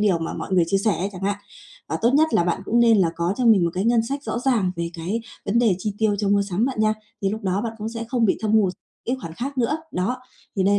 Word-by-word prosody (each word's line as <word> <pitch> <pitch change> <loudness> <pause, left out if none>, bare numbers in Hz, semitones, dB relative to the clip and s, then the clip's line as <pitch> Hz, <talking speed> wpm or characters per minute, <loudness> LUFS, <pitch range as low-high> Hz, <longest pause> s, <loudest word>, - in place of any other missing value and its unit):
điều 200 -5 +3
mà 165 - -3
mọi - - -5
người 180 -2 +4
chia 195 +3 +2
sẻ 205 +1 +1
ấy 190 +3 -1
chẳng 185 +1 -9
hạn. 200 +1 0 0.5
À, - - -2
tốt 235 - +5
nhất 310 +2 +5
là 170 - +4
bạn 175 +1 0
cũng 235 +4 +2
nên 230 -3 +5
là 175 -3 +4
có 170 +2 0
cho 255 - 0
mình 205 -6 +6
một 170 - +1
cái 190 +3 -1
ngân 235 -1 +4
sách 280 +5 -4
rõ - - -3
ràng 235 -8 +1
về 170 0 -2
cái 180 +8 -3 0.3
vấn 215 +4 +2
đề 225 -6 +4
chi 210 +2 -2
tiêu 215 -2 +2
cho 205 -1 0
mua 200 0 +3
sắm 200 +2 0
bạn 260 -5 -2
nha, 215 0 +3 0.3
thì 195 - +2
lúc 220 +2 -4
đó 190 +1 0
bạn 230 -1 -3
cũng 215 +1 -3
sẽ 230 0 -5
không 240 -3 +1
bị 195 - +3
thâm 215 -1 0
hụt 205 -4 +4 0.3
cái 250 - -1
khoản 165 -1 -7
khác 270 +5 -4
nữa. 250 +5 +1 0.2
Đó, 190 +8 -1 0.4
thì 190 - +2
đây 200 +1 +4
210 Hz, 300 wpm, -23 LUFS, 190-235 Hz, 0.5 s, mình